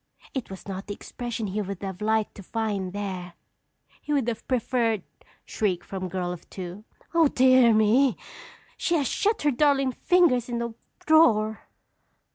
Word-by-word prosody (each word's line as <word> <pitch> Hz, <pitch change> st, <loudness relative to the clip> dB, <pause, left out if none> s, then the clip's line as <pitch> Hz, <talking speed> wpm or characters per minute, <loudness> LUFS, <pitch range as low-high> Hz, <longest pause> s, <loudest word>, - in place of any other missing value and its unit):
It 265 Hz, -4 st, -4 dB
was 190 Hz, 0 st, -10 dB
not 195 Hz, 0 st, -6 dB
the 205 Hz, -, -4 dB
expression 235 Hz, -1 st, -5 dB
he 205 Hz, +2 st, -2 dB
would 200 Hz, -1 st, -6 dB
have 190 Hz, 0 st, -5 dB
liked 220 Hz, 0 st, +1 dB
to -, -, -11 dB
find 200 Hz, -2 st, -2 dB
there. 185 Hz, -3 st, -5 dB, 0.7 s
He -, -, -6 dB
would 275 Hz, -5 st, +1 dB
have 225 Hz, -1 st, -6 dB
preferred 235 Hz, -4 st, 0 dB, 0.2 s
" -, -, -31 dB
(Shriek 190 Hz, -6 st, -1 dB
from 185 Hz, -1 st, -5 dB
girl 180 Hz, 0 st, -2 dB
of 175 Hz, -, -12 dB
two.) 185 Hz, +3 st, -8 dB, 0.3 s
Oh, 330 Hz, -2 st, +5 dB
dear 255 Hz, -3 st, +5 dB
me! 225 Hz, +4 st, +4 dB, 0.6 s
She 345 Hz, -, 0 dB
has 290 Hz, -4 st, +1 dB
shut 420 Hz, -, 0 dB
her 295 Hz, -, +3 dB
darling 275 Hz, 0 st, +2 dB
fingers 255 Hz, -5 st, +3 dB
in 240 Hz, -, -2 dB
the 235 Hz, -1 st, -3 dB, 0.3 s
drawer! 220 Hz, -10 st, +4 dB
220 Hz, 165 wpm, -26 LUFS, 195-260 Hz, 0.7 s, Oh